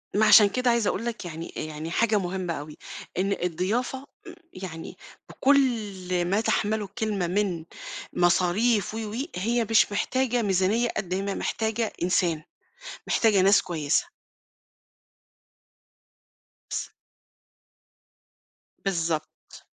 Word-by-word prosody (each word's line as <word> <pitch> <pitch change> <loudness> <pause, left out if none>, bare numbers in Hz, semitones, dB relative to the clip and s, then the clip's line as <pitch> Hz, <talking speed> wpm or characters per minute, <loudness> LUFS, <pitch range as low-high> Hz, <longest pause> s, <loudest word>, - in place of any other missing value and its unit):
ما 215 +1 +4
عشان 210 -1 +8
كده 250 +3 0
عايزة 235 -3 +1
أقول 230 - -1
لك 230 -5 -4
يعني 165 0 -7
يعني 155 +1 -5
حاجة 215 0 +2
مهمة 180 -1 -3
أوي، 150 0 -8 0.4
إن 195 +2 +1
الضيافة 205 +10 -1 0.3
م 350 - -8 0.2
يعني 175 -3 -8 0.3
بكل 210 -10 +1
ما 200 +5 +1
تَحمَلُه 215 -1 0
الكلمة 200 -2 -2
من 180 -3 -1 0.5
مصاريف 190 +6 +2
و، - - -4
و - - -5 0.2
هي 230 +5 0
مش 220 -2 +4
محتاجة 245 +3 0
ميزانية 205 +4 +2
قد 180 -2 -2
ما 195 +1 -1
هي - - -3
محتاجة 220 0 -1
إنسان. 175 -3 +1 0.6
محتاجة 210 -4 +3
ناس 195 +2 +5
كويسة. 170 - 0 2.6
س - - -3 1.9
بالضبط. 165 -4 -3
195 Hz, 110 wpm, -26 LUFS, 175-225 Hz, 2.6 s, عشان